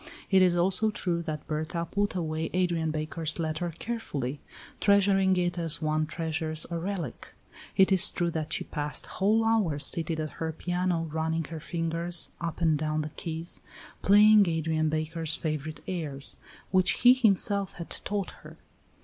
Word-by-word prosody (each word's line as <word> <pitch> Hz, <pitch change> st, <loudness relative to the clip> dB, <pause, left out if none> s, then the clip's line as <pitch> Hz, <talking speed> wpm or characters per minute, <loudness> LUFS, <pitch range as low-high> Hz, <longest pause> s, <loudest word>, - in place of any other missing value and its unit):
It 190 Hz, -1 st, +6 dB
is 180 Hz, -1 st, +4 dB
also 190 Hz, +5 st, +2 dB
true 175 Hz, -5 st, -2 dB
that 155 Hz, -3 st, -5 dB
Berta 160 Hz, +2 st, -3 dB
put 205 Hz, +3 st, -1 dB
away 160 Hz, -2 st, -2 dB
Adrian 175 Hz, -3 st, +1 dB
Baker's 155 Hz, +1 st, -2 dB
letter 165 Hz, +1 st, -2 dB
carefully, 145 Hz, -, -4 dB, 0.4 s
treasuring 195 Hz, -2 st, +4 dB
it 175 Hz, 0 st, 0 dB
as 165 Hz, -1 st, -2 dB
one 155 Hz, -1 st, 0 dB
treasures 160 Hz, -1 st, -3 dB
a 170 Hz, -, -2 dB
relic. 175 Hz, -, -5 dB, 0.4 s
It 190 Hz, 0 st, +5 dB
is 190 Hz, +2 st, +6 dB
true 175 Hz, -1 st, -1 dB
that 160 Hz, 0 st, -4 dB
she -, -, -1 dB
passed 150 Hz, -1 st, -5 dB
whole 215 Hz, +4 st, +1 dB
hours 200 Hz, -11 st, +2 dB
seated 165 Hz, -1 st, +1 dB
at 155 Hz, -1 st, -3 dB
her 160 Hz, 0 st, -1 dB
piano 175 Hz, 0 st, -1 dB
running 160 Hz, +1 st, -1 dB
her 160 Hz, -, -5 dB
fingers 165 Hz, +1 st, +1 dB
up 170 Hz, 0 st, -4 dB
and 160 Hz, -3 st, +3 dB
down 155 Hz, 0 st, -1 dB
the 150 Hz, -, -5 dB
keys, 165 Hz, +2 st, -5 dB, 0.4 s
playing 205 Hz, -1 st, +6 dB
Adrian 160 Hz, -1 st, 0 dB
Baker's 155 Hz, 0 st, -2 dB
favorite 155 Hz, -3 st, -4 dB
airs, 150 Hz, -6 st, -2 dB, 0.4 s
which 185 Hz, -1 st, +3 dB
he 245 Hz, 0 st, +9 dB
himself 200 Hz, -5 st, +2 dB
had 170 Hz, -, -9 dB
taught 200 Hz, -2 st, -2 dB
her. -, -, -13 dB
165 Hz, 160 wpm, -28 LUFS, 155-185 Hz, 0.4 s, he